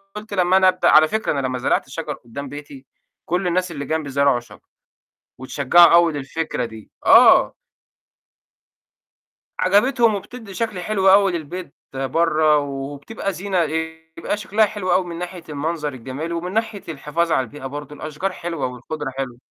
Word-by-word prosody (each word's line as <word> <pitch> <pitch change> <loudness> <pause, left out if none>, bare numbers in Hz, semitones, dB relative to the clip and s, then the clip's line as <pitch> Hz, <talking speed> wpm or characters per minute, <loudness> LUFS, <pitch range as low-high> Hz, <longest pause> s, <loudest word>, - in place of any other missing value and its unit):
قُلت 210 0 -8
لمّا 185 -1 +3
أنا 190 - +5
أبدأ 185 0 +3
على 155 0 +7
فكرة 220 +4 -1
أنا 140 -2 -1
لمّا 130 0 -3
زرعت 125 - 0
الشجر 150 +2 -5
قُدّام 140 +2 -9
بيتي، 145 -2 -10 0.4
كلّ 180 +2 -1
الناس 180 0 0
اللي 140 -2 -5
جَنبي 155 0 -2
زرعوا 140 -2 +2
شجر، 120 - -16 0.8
واتشجّعوا 140 +7 +4
أوي 170 -1 +5
للفكرة 145 -2 -3
دي. 110 -2 -12
آه. - - +7 2.0
عجبتهم 225 +4 +3
وبتدّي 220 +1 -9
شكل 220 -2 -3
حلو 195 +1 +1
أوي 195 0 +5
للبيت 170 -1 -6 0.2
برّا، 155 +3 +2
وبتبقى 145 +8 -4
زينة 185 0 -1
إيه، 160 0 -4
يبقى 165 +5 -2
شكلها 210 +1 +2
حلو 205 -3 -3
أوي، 185 - +2
من 170 -1 -7
ناحية 180 -1 -7
المنظر 150 0 -3
الجميل، 130 +7 -6
ومن 175 +2 -4
ناحية 220 -2 -2
الحفاظ 160 +3 -2
على 130 - +3
البيئة 135 +3 -11
برضه، 145 +2 -7
الأشجار 155 +7 -4
حلوة 170 -5 -4
والخُضرة 135 +4 -6
حلوة. 130 -3 -4
160 Hz, 155 wpm, -21 LUFS, 140-185 Hz, 2.0 s, على